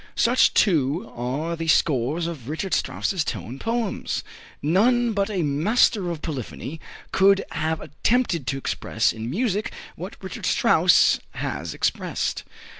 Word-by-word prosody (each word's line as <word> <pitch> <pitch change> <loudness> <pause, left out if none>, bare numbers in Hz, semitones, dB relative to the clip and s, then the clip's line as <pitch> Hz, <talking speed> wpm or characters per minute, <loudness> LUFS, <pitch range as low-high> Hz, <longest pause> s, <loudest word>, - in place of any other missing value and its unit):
Such, 245 +2 +3
too, 165 - +2
are 135 +8 -2
the 165 0 -5
scores 150 +1 +2
of 150 -7 -6
Richard 170 +5 -3
Strauss's 185 -5 0
tone 115 - -5
poems. 230 -3 -2 0.4
None 230 - +3
but 200 0 0
a 190 -5 -1
master 180 +6 +2
of 165 -2 -5
polyphony 150 +1 -5 0.3
could 195 0 +4
have 160 0 -1
attempted 170 - 0
to 135 - -1
express 115 -3 0
in 110 +1 -5
music 210 - -1 0.2
what - - -7
Richard - - -5
Strauss - - +4 0.2
has - - -4
expressed. - - -1
165 Hz, 130 wpm, -24 LUFS, 140-200 Hz, 0.4 s, could